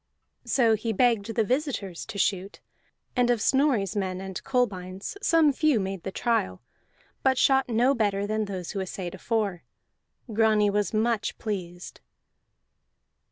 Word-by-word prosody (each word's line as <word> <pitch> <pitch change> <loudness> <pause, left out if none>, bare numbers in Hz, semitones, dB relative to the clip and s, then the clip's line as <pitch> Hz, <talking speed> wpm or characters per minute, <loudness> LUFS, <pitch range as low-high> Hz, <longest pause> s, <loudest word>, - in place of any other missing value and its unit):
So 235 -4 +3
he 220 +1 -1
begged 225 -1 +1
the 225 - +3
visitors 240 - -2
to 225 -2 -7
shoot, 195 0 -1 0.6
and 245 -1 +2
of 240 -2 +2
Snorri's 250 - +2
men 185 -2 -2
and 190 -1 -6
Kolbein's 195 - -2
some 325 -7 +4
few 300 -4 +2
made 190 -2 -3
the 190 - -5
trial, 115 - -1 0.6
but 265 -1 +2
shot 265 -1 +3
no 240 +4 +3
better 205 -5 0
than 215 +1 -1
those 185 -4 -5
who 200 - -4
assayed 185 -2 -5
afore. 205 -7 -2 0.7
Grani 215 -1 +3
was 205 0 0
much 220 0 0
pleased. 180 -5 -6
215 Hz, 140 wpm, -26 LUFS, 195-245 Hz, 0.7 s, some